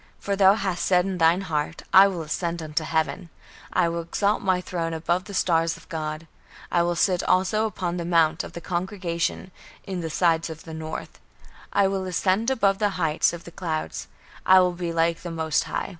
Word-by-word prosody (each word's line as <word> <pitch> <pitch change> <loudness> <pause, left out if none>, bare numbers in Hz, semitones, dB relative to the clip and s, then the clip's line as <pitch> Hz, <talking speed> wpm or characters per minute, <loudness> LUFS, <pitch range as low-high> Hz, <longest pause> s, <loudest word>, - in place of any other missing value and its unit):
For 200 - -2
thou 195 0 +6
hast 190 -4 -2
said 180 -1 +3
in 190 -2 -3
thine 165 +3 +4
heart, 160 -3 -3
I 190 +2 +9
will 180 -4 -3
ascend 170 +1 -3
unto 155 +1 -2
heaven, 160 +3 -1 0.4
I - - +2
will 170 0 -2
exalt 200 +5 0
my 185 -2 +1
throne 170 -2 -3
above 175 +3 -1
the 200 - -7
stars 165 -3 +1
of - - -18
God; 155 -1 -4 0.5
I 175 - +3
will 175 0 0
sit 180 +1 +2
also 215 +4 +2
upon 180 -4 -3
the 170 - -3
mount 165 -1 +2
of - - -9
the 170 - -7
congregation, 180 0 -3 0.3
in 185 -2 -4
the 165 - -4
sides 165 0 +1
of 160 0 -9
the 160 - -9
north; 160 0 -7 0.5
I 200 - +3
will 190 -1 -2
ascend 190 +5 +1
above 200 -7 +2
the 210 -1 +2
heights 160 -1 +2
of 170 0 -8
the 170 - -11
clouds; 160 -3 -4 0.4
I 190 0 +7
will 180 -1 +3
be 175 -1 -4
like 165 0 +1
the 175 - -6
most 160 -2 0
High." - - -3
175 Hz, 205 wpm, -25 LUFS, 165-190 Hz, 0.5 s, I